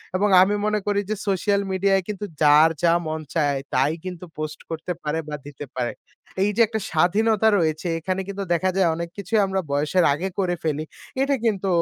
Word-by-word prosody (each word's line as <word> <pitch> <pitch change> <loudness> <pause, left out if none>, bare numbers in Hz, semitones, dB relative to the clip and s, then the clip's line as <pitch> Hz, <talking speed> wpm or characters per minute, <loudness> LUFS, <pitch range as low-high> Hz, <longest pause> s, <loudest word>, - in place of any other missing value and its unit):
এবং 205 +2 +2
আমি 205 +2 +3
মনে 215 0 +1
করি 205 0 +2
যে 215 - 0
সোশ্যাল 200 +1 +1
মিডিয়ায় 195 0 +2
কিন্তু 210 -1 -4 0.2
যার 150 +2 +7
যা 170 0 +5
মন 155 0 -2 0.2
চায় 145 -3 +1
তাই 135 +4 +2
কিন্তু 180 -1 -6
পোস্ট 155 0 -5
করতে 165 +2 -4
পারে 150 +2 -1
বা 150 - -3
দিতে 145 0 -8
পারে। 125 -2 -1 0.5
এই 205 - +2
যে 235 - +3
একটা 220 0 -3
স্বাধীনতা 210 +6 +3
রয়েছে 160 +1 -1
এখানে 185 +3 -2
কিন্তু 200 0 -4
দেখা 185 +3 +1
যায় 190 -3 +3
অনেক 170 0 -4
কিছুই 205 +3 0
আমরা 190 0 -1
বয়সের 150 +5 +2
আগে 175 +6 -2
করে 180 -2 +1
ফেলি। 155 -1 -1 0.4
এটা 275 0 +2
কিন্তু 200 -3 0
185 Hz, 195 wpm, -23 LUFS, 155-200 Hz, 0.5 s, যার